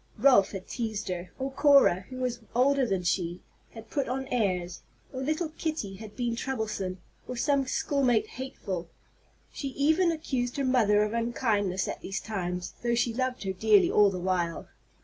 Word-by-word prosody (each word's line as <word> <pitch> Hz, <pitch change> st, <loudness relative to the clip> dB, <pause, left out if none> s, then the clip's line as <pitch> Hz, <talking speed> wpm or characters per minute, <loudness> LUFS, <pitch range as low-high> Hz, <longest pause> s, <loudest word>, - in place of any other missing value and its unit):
Ralph 250 Hz, -8 st, +5 dB
had 190 Hz, -2 st, -6 dB
teased 220 Hz, -5 st, -3 dB
her; 180 Hz, 0 st, -4 dB
or 265 Hz, +1 st, -3 dB
Cora, 270 Hz, -10 st, +5 dB
who 255 Hz, -, -7 dB
was 250 Hz, -2 st, -2 dB, 0.2 s
older 265 Hz, +1 st, +3 dB
than 190 Hz, -3 st, -1 dB
she, 175 Hz, 0 st, -1 dB, 0.3 s
had 225 Hz, -1 st, -11 dB
put 280 Hz, -, 0 dB
on 265 Hz, +1 st, -2 dB
airs; 185 Hz, -7 st, -1 dB, 0.3 s
or 260 Hz, -, -4 dB
little 310 Hz, +4 st, -1 dB
Kitty 305 Hz, -, -4 dB
had 215 Hz, 0 st, -10 dB
been 240 Hz, -2 st, -1 dB
troublesome, 220 Hz, -7 st, -3 dB, 0.3 s
or 250 Hz, -, -5 dB
some 275 Hz, +2 st, +1 dB
schoolmate 255 Hz, -5 st, +1 dB
"hateful." 195 Hz, -10 st, -6 dB, 0.6 s
She 280 Hz, -, -4 dB
even 315 Hz, +6 st, +2 dB
accused 260 Hz, -6 st, -2 dB
her 275 Hz, -, 0 dB
mother 215 Hz, -5 st, +4 dB
of 210 Hz, +1 st, -2 dB
unkindness 220 Hz, -5 st, 0 dB
at -, -, -5 dB
these 195 Hz, -, -3 dB
times, 180 Hz, -4 st, -4 dB
though 235 Hz, 0 st, +1 dB
she 235 Hz, 0 st, +1 dB
loved 255 Hz, -2 st, -2 dB
her 190 Hz, -1 st, -2 dB
dearly 210 Hz, +1 st, +4 dB
all 205 Hz, -1 st, +6 dB
the 190 Hz, -, -4 dB
while. 175 Hz, -2 st, -1 dB
230 Hz, 170 wpm, -28 LUFS, 195-265 Hz, 0.6 s, all